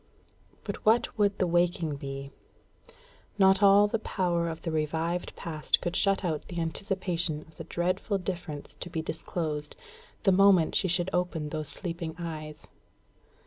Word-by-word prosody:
But - - -4
what 230 +2 +3
would 205 -2 +2
the 185 - +2
waking 175 -3 +1
be? 135 0 -6 1.1
Not 190 0 +5
all 200 +1 +7
the 220 +2 -1
power 175 -5 0
of 160 0 -7
the 165 - -2
revived 160 +3 -1
past 155 -2 0
could 175 - -3
shut 195 -1 +2
out 155 -4 -2
the 175 - -5
anticipation 170 -2 -1
of 160 0 -18
the - - -7
dreadful 185 +4 -1
difference 170 -6 -5
to 175 - -4
be 160 -1 -3
disclosed, 155 -2 -3 0.5
the 195 - +5
moment 190 -3 +5
she 190 - +2
should 175 +1 +1
open 180 -4 -1
those 155 -1 -3
sleeping 170 -3 -4
eyes. 155 -3 -6
170 Hz, 150 wpm, -29 LUFS, 160-190 Hz, 1.1 s, all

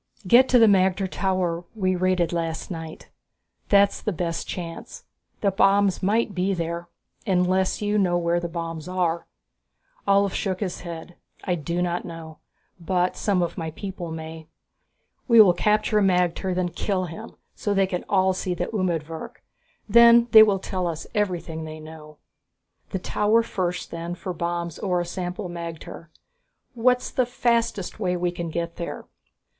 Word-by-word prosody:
"Get 245 +7 +6
to 250 - +6
the 230 - +7
magter 190 -1 +3
tower 185 -3 -1
we 185 -3 0
raided 180 -2 +1
last 165 +1 -3
night, 165 -2 -8 0.6
that's 200 0 +4
the 215 - -1
best 170 -1 -3
chance. 165 -2 -7 0.4
The 200 - +2
bombs 195 0 +3
might 210 +2 +1
be 190 +1 0
there.... 170 0 -4 0.4
Unless 185 +1 +1
you 210 0 +1
know 180 -3 +2
where 170 0 +1
the 170 0 -4
bombs 165 -1 -5
are?" 175 -2 -1 0.8
Ulv 200 -1 +3
shook 190 -2 -2
his 185 -4 -3
head. 170 0 -8 0.3
"I 180 - 0
do 170 +2 -2
not 175 0 -2
know, 160 -2 -9 0.4
but 180 +1 0
some 195 -4 +1
of 170 - -4
my 160 -1 -3
people 185 +1 -6
may. 160 0 -8 0.8
We 235 -3 +6
will 195 -5 +8
capture 210 +3 +2
a - - +1
magter, 180 -1 +1
then 180 -1 0
kill 185 +2 -2
him, 180 +7 -9 0.2
so 205 - -3
they 195 0 +4
can 180 -1 -3
all 190 -1 +3
see 185 -1 -3
the - - -2
umedvirk. 165 -5 -3 0.4
Then 235 +2 +7
they 220 - +10
will 210 -2 +5
tell 185 -1 -3
us 165 -2 -4
everything 175 -6 -2
they 155 0 -8
know." 155 -1 -12 0.7
"The - - -2
tower 210 +4 +2
first 180 -5 -3
then, 170 +1 -5
for 180 +1 -5
bombs 170 -1 -3
or 180 -2 0
a 175 - -2
sample 180 +2 -4
magter. 170 -1 -8 0.7
What's 250 +1 +1
the 255 -2 +1
fastest 235 -5 0
way 180 -4 0
we 175 0 0
can 170 -1 -5
get 170 +1 -4
there?" 170 - -6
180 Hz, 160 wpm, -24 LUFS, 170-195 Hz, 0.8 s, they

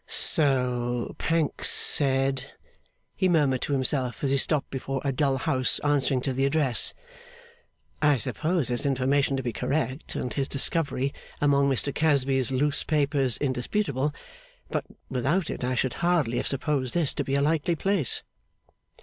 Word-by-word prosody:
'So 125 -5 +2
Pancks 165 -2 0
said,' 135 -1 +1 0.6
he 185 - +1
murmured 145 -7 +2
to - - -3
himself, 130 -1 0
as 135 - +1
he 140 - +3
stopped 145 +1 +1
before 135 0 -3
a 140 - +1
dull 135 0 +1
house 130 0 +2
answering 145 -2 +1
to 135 0 -2
the 135 +1 -1
address. 140 -3 +1 1.1
'I 150 -2 +4
suppose 155 - -1
his 120 +3 0
information 135 +1 +1
to 130 - -3
be 120 -2 -3
correct 135 -1 -3
and 125 - -3
his 135 +3 -1
discovery, 140 -1 0 0.3
among 140 -1 +3
Mr 135 +1 0
Casby's 135 -4 +2
loose 145 +2 +1
papers, 145 -4 +1
indisputable; 140 +2 -1 0.6
but, - - -2 0.2
without 140 +8 -1
it, - - -6
I 125 +1 -1
should 130 0 0
hardly 170 -9 0
have - - -1
supposed 135 -2 -2
this 165 -5 +1
to - - -2
be 135 - -2
a 140 - +2
likely 160 +2 +1
place. 185 - 0
140 Hz, 150 wpm, -26 LUFS, 130-150 Hz, 1.1 s, I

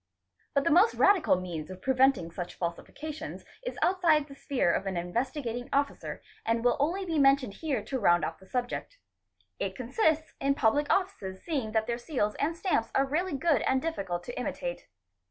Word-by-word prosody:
But 280 - +3
the - - +2
most 370 +9 +5
radical 395 - +5
means 170 -4 -5
of 185 0 -8
preventing 260 -9 +3
such 175 +1 -6
falsifications 300 - -5 0.2
is - - -5
outside 335 -5 +3
the 280 - -12
sphere 275 - 0
of 195 - -1
an 190 -2 -2
Investigating 245 - -2
Officer 280 0 -1 0.2
and 230 +1 0
will 245 - +5
only 350 +7 0
be 325 -4 0
mentioned 275 -5 +4
here 280 -9 -1
to 265 - -3
round 175 -5 +4
off 160 - -5
the 190 - -17
subject. 250 - -3 0.6
It 190 -1 -2
consists 315 - 0
in 275 0 +2
public 285 +4 +2
oflices 360 - -1
seeing 265 -10 -2
that 220 -1 +2
their 235 +1 -2
seals 240 -6 -1
and 325 +4 0
stamps 330 - 0
are 270 - +4
really 310 +2 -1
good 295 -5 +2
and 265 - +2
difficult 195 - -3
to 245 - -7
imitate. - - -4
270 Hz, 180 wpm, -29 LUFS, 215-315 Hz, 0.6 s, most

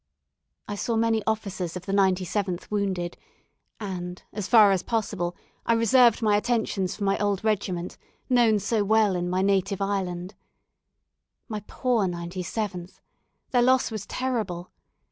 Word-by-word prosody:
I 205 - -4
saw 225 +3 -2
many 225 0 +2
officers 195 -6 -2
of 180 - -10
the - - -3
97th 190 -1 0
wounded; 190 -4 -1 0.6
and, 180 -3 -5
as 210 -2 -4
far 215 -4 +7
as 190 -2 +2
possible, 205 -6 -2 0.3
I 230 - +2
reserved 230 0 +4
my 210 -1 +4
attentions 210 -5 -1
for 205 - -5
my 195 0 +1
old 205 -1 0
regiment, 185 -5 -1 0.3
known 240 -4 +4
so 210 +1 0
well 215 -1 +3
in 175 0 -1
my 185 +1 +1
native 195 0 +1
island. 190 -2 -2 1.1
My 215 -4 -4
poor 240 -6 +1
97th! 180 +2 -4 0.5
their 245 - +4
loss 255 0 +3
was 215 -3 -5
terrible. 215 -9 -3
200 Hz, 140 wpm, -26 LUFS, 185-220 Hz, 1.1 s, far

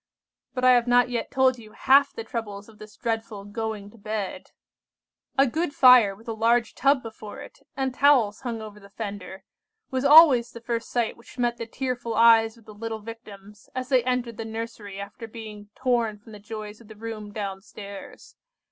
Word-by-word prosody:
"But 255 0 0
I 255 - +8
have 245 -1 +4
not 245 0 +4
yet 240 - -2
told 260 -2 +2
you 215 -2 -14
half 275 +4 +4
the 225 - -7
troubles 210 -3 -6
of 220 -2 -18
this 215 0 -13
dreadful 225 -3 -3
'going 210 -1 -5
to 230 - -18
bed.' 210 -1 -5 0.9
A 275 - +6
good 295 +4 -2
fire 250 -6 +7
with 225 +4 -19
a 225 - -2
large 230 +1 +2
tub 275 -1 +2
before 220 -2 -9
it, - - -12 0.2
and 265 -1 -1
towels 255 -7 +3
hung 235 -4 -4
over 210 -1 -10
the 200 -1 -16
fender, 200 -3 -7 0.5
was 260 0 -1
always 280 -5 +8
the 235 - -8
first 230 0 -4
sight 240 -2 -1
which 235 - -17
met 240 -1 0
the 230 - -6
tearful 245 -2 -3
eyes 225 -1 +5
of 225 - -20
the 215 - -12
little 225 +1 -5
Victims 210 -2 -12
as 255 0 -4
they 255 -3 +3
entered 245 -3 -2
the 225 - -4
nursery 220 -3 -7
after 205 +3 -8
being 215 -2 -10
torn 235 -4 0
from 215 +2 -16
the 210 - -10
joys 215 +1 -8
of 230 - -17
the 220 - -12
room 215 -1 -7
down 195 -2 -5
stairs. 200 -1 -11
225 Hz, 195 wpm, -25 LUFS, 210-245 Hz, 0.9 s, I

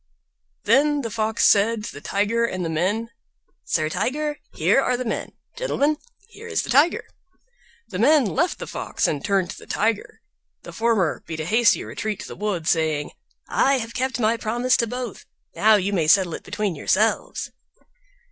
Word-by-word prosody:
Then 285 +6 +3
the 230 - -4
Fox 220 0 0
said 215 +2 +4
to - - -6
the 145 - -10
Tiger 210 +7 0
and 185 -6 -2
the 165 - -2
men, 205 +8 -1 0.5
"Sir 155 -2 0
Tiger, 290 - -2
here 270 - +2
are 250 -2 0
the 255 - -4
men; 225 - -3 0.2
gentlemen, 310 - 0 0.3
here 450 +1 -12
is 445 - -1
the - - -5
Tiger." 290 +7 +3 0.8
The 190 -5 -6
men 285 +3 +5
left 315 - 0
the - - -6
Fox - - -2
and 145 -3 -2
turned 195 -3 +1
to - - -10
the - - -14
Tiger. 220 0 -1 0.4
The - - -10
former 220 -9 +1
beat 160 -1 -5
a - - -4
hasty 225 +5 +3
retreat 215 -2 -4
to - - -8
the - - -8
wood, 195 -6 -3
saying, 155 -3 +1 0.4
"I 275 0 +2
have 230 -2 -5
kept 260 0 -2
my 225 0 +2
promise 240 +4 +1
to 235 - 0
both; 245 -2 -6 0.3
now 220 +1 +5
you 200 0 0
may 165 -5 +1
settle 180 0 +4
it - - -5
between 205 -1 -2
yourselves." 205 +8 0
220 Hz, 180 wpm, -23 LUFS, 190-250 Hz, 0.8 s, men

